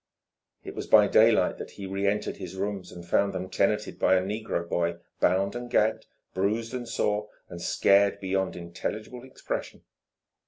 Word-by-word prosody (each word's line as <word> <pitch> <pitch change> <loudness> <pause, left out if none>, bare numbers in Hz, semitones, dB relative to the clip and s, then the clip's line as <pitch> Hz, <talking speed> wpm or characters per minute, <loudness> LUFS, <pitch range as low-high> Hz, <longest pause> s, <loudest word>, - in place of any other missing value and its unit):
It - - -7
was - - -6
by - - +7
daylight - - +4
that - - -6
he 100 - -6
reentered 100 +2 -1
his 95 0 -7
rooms 95 -1 -4
and 85 -1 -10
found 100 +3 +2
them 95 0 -5
tenanted 105 +3 0
by - - +4
a 90 - +3
negro 100 -4 -3
boy 85 0 0 0.2
bound 95 +4 +2
and 120 0 -5
gagged, 110 -1 +1 0.3
bruised 110 +5 -1
and 125 -2 -4
sore, 105 0 0 0.2
and 85 - -8
scared 100 +2 +3
beyond 95 0 -1
intelligible 105 +8 -6
expression. 130 - -6
100 Hz, 160 wpm, -27 LUFS, 95-105 Hz, 0.3 s, by